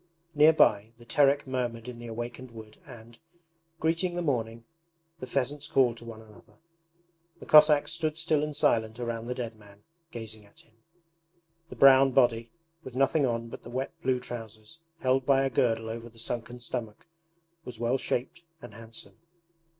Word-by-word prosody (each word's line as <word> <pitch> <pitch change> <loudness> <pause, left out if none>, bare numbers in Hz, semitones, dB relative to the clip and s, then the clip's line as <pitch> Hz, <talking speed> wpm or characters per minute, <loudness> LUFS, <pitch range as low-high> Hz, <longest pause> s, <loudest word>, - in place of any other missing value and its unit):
Near 150 +1 +7
by, 110 -7 +3
the 120 - -16
Terek 140 +4 +3
murmured 125 -3 -3
in 125 -1 -8
the 120 - -8
awakened 120 +2 -6
wood 110 -2 -13
and, 115 -3 -13 0.6
greeting 165 +2 0
the 175 - -2
morning, 115 -5 -2 0.5
the 130 - -7
pheasants 140 +3 -2
called 130 -6 +3
to 115 - -12
one 110 -1 -10
another. 105 -2 -19 0.8
The - - -11
Cossacks 150 -1 +6
stood 155 -1 -2
still 160 -2 +1
and 150 -1 -4
silent 110 0 +1
around 115 -1 -4
the 125 - -3
dead 120 -3 -5
man, 100 -1 -18 0.3
gazing 110 -5 -8
at 100 - -19
him. 115 - -28 1.0
The - - -9
brown 135 -1 +6
body, 115 -3 +2 0.3
with 130 -4 -10
nothing 135 +2 +2
on 115 -1 -3
but - - -9
the - - -11
wet 130 +2 -3
blue 130 -1 +1
trousers 115 +2 -9 0.2
held 130 +1 +2
by 135 0 +3
a 135 - -1
girdle 115 -2 +1
over 115 +1 -6
the 115 - -22
sunken 120 +1 -5
stomach, 120 -3 -6 0.6
was 125 -6 -9
well 120 +3 0
shaped 130 +9 -3 0.2
and 120 -6 -12
handsome. 115 +1 -11
120 Hz, 170 wpm, -28 LUFS, 115-135 Hz, 1.0 s, Near